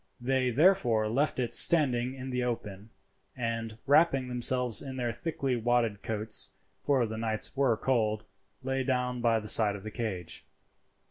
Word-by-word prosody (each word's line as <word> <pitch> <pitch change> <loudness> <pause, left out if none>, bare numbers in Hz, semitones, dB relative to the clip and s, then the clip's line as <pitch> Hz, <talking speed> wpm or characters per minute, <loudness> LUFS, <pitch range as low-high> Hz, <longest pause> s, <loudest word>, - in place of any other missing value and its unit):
They 130 +1 0
therefore 125 - +3
left 135 +6 0
it 120 -2 -1
standing 130 -6 +4
in 130 0 -7
the 125 0 -1
open, 105 -4 -5 0.5
and, 115 -2 -4
wrapping 140 -3 +3
themselves 125 -2 0
in 135 -2 -7
their 120 -2 -2
thickly 135 -1 -2
wadded 115 -3 0
coats, 110 0 -1 0.3
for 135 -4 +2
the 110 0 -6
nights 110 -1 -2
were 135 -5 +2
cold, 110 -4 0 0.4
lay 135 0 -1
down 125 -1 -1
by 115 -1 +2
the 105 - -8
side 105 -1 +3
of 100 - -9
the 110 - -7
cage. 95 -8 -5
120 Hz, 155 wpm, -29 LUFS, 110-130 Hz, 0.5 s, standing